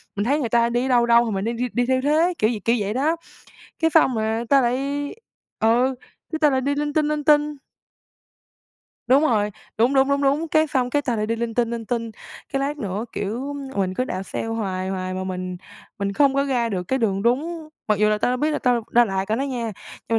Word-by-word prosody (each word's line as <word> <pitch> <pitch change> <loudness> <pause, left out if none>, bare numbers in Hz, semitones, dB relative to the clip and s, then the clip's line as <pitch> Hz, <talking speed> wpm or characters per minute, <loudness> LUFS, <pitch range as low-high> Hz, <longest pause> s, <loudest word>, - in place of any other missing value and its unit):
mình 205 - -1
thấy 285 +5 +2
người 240 -5 -2
ta 235 0 +3
đi 240 +1 0
ở - - -1
đâu 245 -2 +4
đâu 235 0 +5
thì 225 - -2
mình 195 +1 -2
đi 230 - -1
đi 250 +2 -2
đi 245 0 +1
theo 260 0 +1
thế, 315 +6 +2
kiểu 215 - +2
vậy 220 -4 -3
kiểu 230 - +3
vậy 205 0 -2
đó, 290 +7 +1 0.6
cái 325 -1 +3
sao 320 - +6
mà 225 -2 -1
ta 275 -1 +5
lại, 240 0 +1 0.8
ừ, 245 +4 +3 0.4
cái 315 - -2
ta 300 -2 +5
lại 265 -1 +1
đi 285 +2 0
linh 295 0 -2
tinh, 305 -1 +2
linh 300 0 -1
tinh. 295 0 +3 1.5
Đúng 265 +4 +5
rồi, 215 -8 +2 0.3
đúng, 245 +5 +3
đúng, 270 0 +4
đúng, 280 0 +1
đúng, 285 +4 +1
cái 310 +1 +3
xong 255 -4 0
cái 290 +2 +1
ta 245 -4 -1
lại 215 0 -1
đi 230 - -1
linh 230 -1 -3
tinh, 235 -1 +1
linh 230 -1 -4
tinh, 230 -1 -2 0.4
cái 275 - 0
lát 285 +2 -2
nữa, 205 -1 -3
kiểu, 245 +8 -3 0.2
mình 185 -1 0
cứ 255 - 0
đạp 185 -6 -4
xe 195 - -5
hoài 195 -5 -3
hoài 185 -1 -3
mà 185 0 -3
mình 185 -1 -4 0.4
mình 200 0 -1
không 275 +4 +3
có 275 - +2
ra 250 -4 0
được 190 -5 -2
cái 265 - +1
đường 195 -4 0
đúng, 310 +7 -1 0.2
mặc 210 -2 +2
dù 210 - +4
là 215 0 +1
tao 230 - +1
đã - - 0
biết 300 +5 0
là 300 - -1
tao 245 -3 +1
đã 240 0 +5
lạc 195 -1 -2
rồi 220 - +1
đó 265 - -1
nha, 245 -5 -3 0.4
nhưng 230 - +2
240 Hz, 250 wpm, -23 LUFS, 215-280 Hz, 1.5 s, sao